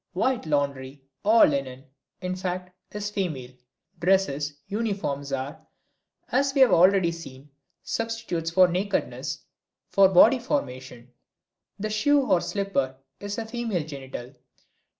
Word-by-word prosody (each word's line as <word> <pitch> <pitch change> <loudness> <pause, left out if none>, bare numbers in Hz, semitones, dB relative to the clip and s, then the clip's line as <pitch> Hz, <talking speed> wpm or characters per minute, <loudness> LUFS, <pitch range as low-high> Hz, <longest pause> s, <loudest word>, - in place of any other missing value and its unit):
White 240 +1 0
laundry, 140 -2 -2 0.2
all 225 +3 +7
linen, 135 -2 -2 0.4
in 185 -1 -2
fact, 180 0 -4 0.2
is 210 0 -4
female. 155 -11 -3 0.5
Dresses, 150 -6 +1
uniforms 195 -10 -3
are, 135 +2 -4 0.7
as 275 +2 +1
we 275 - +4
have 260 - +7
already 180 0 +5
seen, 145 -4 -11 0.3
substitutes 225 -8 -3
for 185 +2 +5
nakedness, 190 +3 -2 0.5
for 195 -1 +6
body 220 +8 +6
formation; 130 - -4 0.6
the 215 +2 -3
shoe 285 +7 +3
or 180 -8 +3
slipper 185 -10 -1 0.2
is 205 0 -5
a 230 - -3
female 225 -7 -2
genital. 135 -3 -8
180 Hz, 120 wpm, -26 LUFS, 140-210 Hz, 0.7 s, all